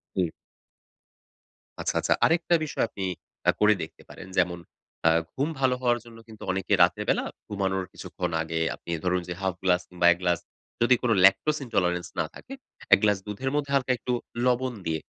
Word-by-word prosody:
জ্বি। 90 -3 +1 1.5
আচ্ছা, - - -1
আচ্ছা। - - +2
আরেকটা 170 +1 +3
বিষয় 150 - -1
আপনি 100 - -6 0.5
আ - - +8
করে 105 0 +6
দেখতে 80 - -10
পারেন। - - -10
যেমন 85 -1 +2 0.5
আ - - +8 0.3
ঘুম 140 +4 0
ভালো 130 -1 +3
হওয়ার 120 -1 +2
জন্য 115 -1 -13
কিন্তু 110 -2 -12
অনেকে 95 +2 -1
রাতের 90 +4 +2
বেলা - - +2 0.2
ঘুমানোর 95 -2 -1
কিছুক্ষণ 90 -1 -4
আগে 80 0 -2 0.2
আপনি - - -15
ধরুন 90 0 +1
যে 90 - -3
1/2 95 -2 -1
গ্লাস 90 -1 +3
কিংবা 90 -1 -1
১ 85 - +1
গ্লাস 90 -1 +2 0.4
যদি 120 +1 +6
কোন 120 -2 +1
lactose 150 +10 +4
intolerance 90 -6 0
না - - +2
থাকে, 270 - -10 0.4
১ - - +8
গ্লাস 105 -2 +4
দুধের 115 +6 -3
মধ্যে 140 -1 -1
হালকা 130 -2 +2
একটু 125 - -2 0.3
লবণ 125 0 +1
দিয়ে 80 -1 -1
100 Hz, 180 wpm, -26 LUFS, 90-125 Hz, 1.5 s, আ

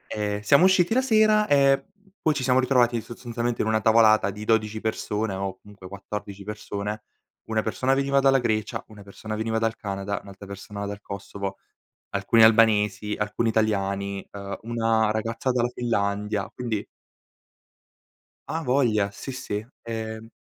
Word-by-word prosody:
Ehm, 105 -1 -2
siamo 140 - +5
usciti 190 +1 +4
la 260 - +4
sera 215 -4 +4
e 140 -2 +4
p 200 -1 -31
poi 155 - +2
ci 130 - -2
siamo 125 0 +3
ritrovati 125 -3 +3
sostanzialmente 120 0 -3
in 110 - -2
una 110 0 +2
tavolata 110 -2 +5
di 105 +2 -7
12 110 -1 +1
persone 110 -1 -2
o 95 0 -4
comunque 100 -3 -13
14 100 0 -7
persone: 105 0 -5 0.4
una 110 -1 0
persona 130 +6 0
veniva 140 0 +2
dalla 135 0 +5
Grecia, 110 -4 -1
una 105 -2 -13
persona 110 +2 -7
veniva 110 +1 -1
dal 115 0 0
Canada, 100 -2 -4
un'altra 100 0 -12
persona 100 +1 -7
dal 100 0 -6
Kosovo, 100 0 -6 0.5
alcuni 115 -1 +4
albanesi, 105 -2 +4
alcuni 105 +2 0
italiani, 100 -2 -1
ehm, 100 -1 -6
una 115 -1 +1
ragazza 115 +4 -1
dalla 120 -1 +1
Finlandia. 105 -3 -1
Quindi 115 -4 -3 1.6
A 165 +1 -2
voglia, 120 -7 +2
sì 135 +6 -7
sì. 110 -4 -4 0.2
Ehm, 110 -1 -5
110 Hz, 150 wpm, -25 LUFS, 100-120 Hz, 1.6 s, siamo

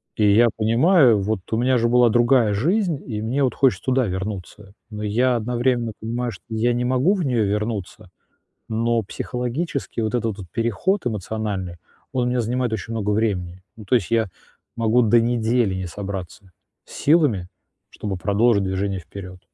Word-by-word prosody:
И 105 -2 +3
я 120 +1 +6
понимаю: 120 - +4
"Вот 105 +1 -1
у - - +2
меня 125 +2 +2
же 120 - +2
была 120 -1 +5
другая 120 -1 +3
жизнь, 170 - +1
и 110 -4 -4
мне 130 +6 -1
вот 130 - 0
хочется 135 -3 +2
туда 130 -1 +2
вернуться". 95 +1 -6 0.2
Но 105 0 -6
я 120 +4 +2
одновременно 120 0 0
понимаю, 120 +2 -3
что 95 - -13
я 115 +2 +1
не 120 +1 -1
могу 130 +9 +2
в 185 - -2
неё 120 -5 +1
вернуться. 105 -2 -3 0.6
Но 115 +1 0
психологически 125 - -4
вот 110 -1 -2
этот 115 -3 -1
вот 95 -3 -9
переход 120 - 0
эмоциональный, 105 -4 -3 0.4
он 125 -1 +1
у - - +1
меня 125 0 0
занимает 120 +1 -1
очень 110 +2 -4
много 105 -2 -1
времени. 95 -4 -1 0.2
Ну, 110 - -10
то 110 - +2
есть 115 -2 0
я 115 -2 +2 0.5
могу 115 +1 +3
до 115 0 +4
недели 115 -3 +1
не 95 -1 -4
собраться 95 0 -7 0.3
с - - -15
силами, 140 - +2 0.4
чтобы 100 -2 -4
продолжить 100 +2 +2
движение 95 0 -2
вперед. 90 +1 -10
115 Hz, 170 wpm, -22 LUFS, 100-125 Hz, 0.6 s, я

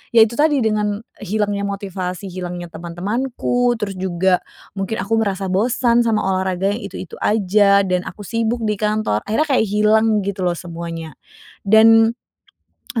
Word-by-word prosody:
yaitu 225 0 +6
tadi 300 -2 +3
dengan, 210 -1 0 0.2
hilangnya 205 0 -1
motivasi, 195 -2 -5
hilangnya 175 -1 -6
teman-temanku, 235 +9 -1
terus 200 -3 -3
juga 185 0 +1 0.4
mungkin 195 +3 -3
aku 215 +3 0
merasa 195 -2 -2
bosan 235 +4 +2
sama 220 -2 +1
olahraga 190 0 0
yang 215 +4 -4
itu-itu 185 - -8
aja, 200 -1 +3
dan 180 -1 +1
aku 205 - -8
sibuk 230 +2 -1
di 215 -1 0
kantor. 215 - 0
Akhirnya 220 +9 +2
kayak 255 -4 +3
hilang 215 +1 +3
gitu 195 -1 -4
loh 175 - 0
semuanya, 165 -2 -7 0.5
dan, 225 +2 +6 0.8
e 230 - 0
205 Hz, 145 wpm, -19 LUFS, 185-225 Hz, 0.8 s, yaitu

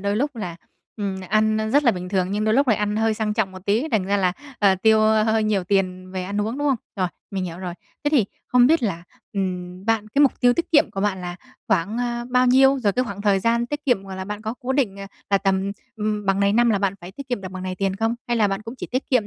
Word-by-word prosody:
đôi 200 +1 -1
lúc 280 +3 -1
là, 180 -6 -5 0.4
ừm, 195 -3 -3
ăn 215 +1 +2
rất 290 +2 +4
là 240 - +6
bình 180 -1 -6
thường 185 -1 0
nhưng 210 +2 -1
đôi 215 0 +2
lúc 275 +2 +3
lại 220 - +4
ăn 210 0 -1
hơi 220 0 +2
sang 215 -1 -1
trọng 210 -4 0
một 185 0 -11
tí, 225 +9 +1
thành 210 -4 +2
ra 200 +2 +1
là, 185 -3 +2 0.3
ờ, 200 -2 +4
tiêu 220 +3 +4
hơi 220 0 +3
nhiều 205 -3 +1
tiền 185 -1 -1
về 185 -1 -3
ăn 200 +2 -2
uống, 225 +6 -2
đúng 290 0 +1
không? 270 - +2 0.2
Rồi, 185 -2 0 0.2
mình 190 -2 -2
hiểu 170 -1 -6
rồi. 180 -2 -5 0.3
Thế - - +3
thì 275 -8 +4 0.2
không 250 0 +5
biết 320 +1 +3
là, 190 -7 -2 0.3
ừm, 185 -1 -4
bạn 220 -1 0
cái 280 +6 +3
mục 280 - +2
tiêu 245 -1 +5
tiết 340 - -2
kiệm 300 0 +5
của 195 - -4
bạn 195 -2 0
là 175 -1 -5 0.3
khoảng, 205 +8 +1
à, 240 -1 -2
bao 250 0 +4
nhiêu? 270 +2 +5
Rồi 210 -6 +1
cái 250 +5 0
khoảng 200 -3 -6
thời 200 -2 +3
gian 235 +3 +1
tiết 295 +3 -5
kiệm, 245 -8 +2
gọi 190 -1 -7
là, 190 - -4
bạn 210 +2 -6
có 220 +1 -3
cố 260 0 -2
định, 240 -8 0
à, 195 - -6 0.2
là 200 - +4
tầm, 195 0 0 0.3
ừm, 210 -1 -2
bằng 195 0 +2
này 200 0 +3
năm 235 +2 +4
là 205 - +2
bạn 195 -1 0
phải 175 +2 -10
tiết 275 +5 -9
kiệm 245 -4 -2
được 190 - -6
bằng 185 -1 -6
này 185 0 -3
tiền 195 0 -1
không? 225 +2 0
Hay 240 - +1
là 215 -3 +3
bạn 195 +1 -3
cũng 225 +3 -8
chỉ - - -6
tiết 255 +2 -2
kiệm 250 -6 +3
210 Hz, 285 wpm, -23 LUFS, 195-235 Hz, 0.4 s, là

